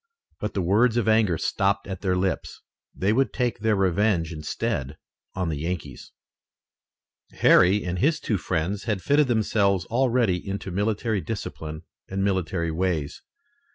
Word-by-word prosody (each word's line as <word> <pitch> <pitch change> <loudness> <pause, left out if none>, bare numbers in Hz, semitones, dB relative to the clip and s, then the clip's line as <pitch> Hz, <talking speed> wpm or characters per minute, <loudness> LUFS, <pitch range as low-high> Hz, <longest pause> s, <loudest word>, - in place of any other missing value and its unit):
But 105 - -4
the 95 - 0
words 110 +7 +3
of 120 - +1
anger 110 -6 +3
stopped 100 +3 0
at 95 -2 -6
their 95 -2 +1
lips. 95 0 -2 0.3
They 100 +3 +1
would 135 +3 +2
take 120 -5 -1
their 110 0 +2
revenge 95 -3 +1
instead 75 -2 -3 0.4
on 90 -2 -1
the 75 -3 -3
Yankees. 85 +3 -5 1.2
Harry 95 +3 +5
and 90 0 -2
his 155 - +2
two 105 -4 -1
friends 95 +3 -2
had 105 -5 -2
fitted 145 0 +3
themselves 100 -5 +1
already 120 -5 +2
into 100 -1 -5
military 105 +2 0
discipline 80 -7 -6 0.3
and 95 0 -2
military 90 -4 0
ways. 80 -4 -2
95 Hz, 145 wpm, -25 LUFS, 90-110 Hz, 1.2 s, Harry